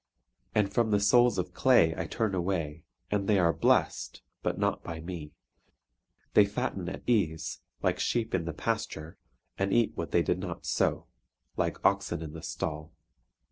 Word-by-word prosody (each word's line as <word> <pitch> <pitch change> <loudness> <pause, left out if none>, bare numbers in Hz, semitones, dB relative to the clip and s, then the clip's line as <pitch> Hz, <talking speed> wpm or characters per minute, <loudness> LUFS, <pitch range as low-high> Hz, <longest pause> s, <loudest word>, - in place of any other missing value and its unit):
And 100 -2 +2
from 115 -2 +2
the 105 -1 +3
souls 120 +3 +5
of 90 0 -2
clay 120 -11 +5
I 85 - -3
turn 110 0 -1
away, 85 -4 -2 0.3
and 100 -1 0
they 105 - +4
are 85 -3 +4
blest, - - +1 0.2
but - - -1
not - - 0
by 80 -1 -6
me. 80 -3 -7 1.0
They 105 - +8
fatten 100 -3 -2
at - - -7
ease, 90 -10 0 0.2
like - - +1
sheep 115 -2 0
in 90 -3 0
the 85 - -2
pasture, 85 -6 -3 0.4
and 95 0 +1
eat 115 0 +3
what 85 - -4
they 85 - +3
did 90 - 0
not 90 -2 -6
sow, - - +1 0.5
like - - 0
oxen 85 -1 +2
in 75 -1 -7
the 80 - -8
stall. 75 0 -4
95 Hz, 170 wpm, -29 LUFS, 85-105 Hz, 1.0 s, They